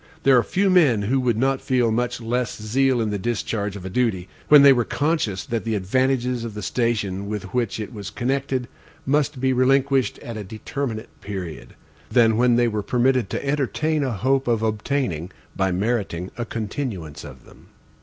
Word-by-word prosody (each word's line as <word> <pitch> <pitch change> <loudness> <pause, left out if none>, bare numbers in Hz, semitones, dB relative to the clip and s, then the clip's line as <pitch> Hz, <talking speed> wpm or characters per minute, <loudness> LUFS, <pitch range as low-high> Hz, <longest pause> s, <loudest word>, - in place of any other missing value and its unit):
There 135 -1 +6
are 125 - +6
few 190 +8 +1
men 140 - +4
who 130 +6 +1
would 120 -4 +1
not 135 +2 +1
feel 125 -3 +1
much 120 +2 -1
less 120 0 -2
zeal 125 +3 +1
in 110 -2 -1
the 105 - -2
discharge 105 -1 -2
of 95 -2 -8
a - - -4
duty 105 -6 0 0.2
when 150 -2 +8
they 140 -1 +9
were 120 -2 +1
conscious 145 - -1
that 115 -1 -2
the 115 -1 -1
advantages 125 +4 0
of 115 -3 -6
the 105 - -5
station 100 -3 -1
with 105 -2 -5
which 120 -4 -1
it 110 +3 -6
was 100 -3 -6
connected 130 +2 -2 0.4
must 145 0 +1
be 130 0 +2
relinquished 135 -1 +2
at 115 -2 -6
a 105 - -5
determinate 110 +3 -5
period, 90 -11 -7 0.3
than 115 -3 +4
when 120 +1 +4
they 120 0 +3
were 105 -2 -1
permitted 125 0 +1
to - - -4
entertain 150 +2 0
a 130 - -1
hope 135 +4 +1
of 115 -2 +1
obtaining, 110 - -1 0.3
by 95 -1 +1
meriting, 95 -3 -2
a 120 - -3
continuance 105 - -5
of - - -12
them. - - -18
120 Hz, 185 wpm, -23 LUFS, 105-130 Hz, 0.4 s, they